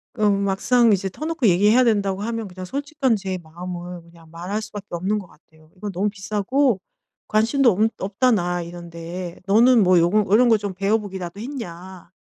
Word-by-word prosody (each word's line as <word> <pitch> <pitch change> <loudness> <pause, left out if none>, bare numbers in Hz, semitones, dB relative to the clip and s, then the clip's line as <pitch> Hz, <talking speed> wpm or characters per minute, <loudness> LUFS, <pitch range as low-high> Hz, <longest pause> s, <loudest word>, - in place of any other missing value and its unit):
어 215 -3 +2
막상 200 +4 +3
이제 195 0 -1
터놓고 310 - -1
얘기해야 205 +7 +4
된다고 200 -4 +1
하면 225 0 -3
그냥 185 0 -8
솔직한 280 - -1
제 190 -3 -4
마음을 175 +1 -8
그냥 170 -1 -19
말할 180 +6 -4
수밖에 205 -1 -8
없는 185 +5 -1
것 205 - -6
같아요. 155 -1 -23
"이건 205 +2 -6
너무 195 +3 -1
비싸고 210 +4 0 0.5
관심도 235 +4 +3
없 215 +4 +2
없다 200 +7 0
나 175 -4 0
이런데. 170 +1 -8
너는 230 +4 +5
뭐 185 -2 +5
요거 190 +4 +2
이런 240 +4 +5
거 225 - +5
좀 200 -2 -5
배워 200 +4 +1
보기라도 190 -3 -7
했냐? 190 -8 -8
195 Hz, 355 characters per minute, -22 LUFS, 180-220 Hz, 0.5 s, 너는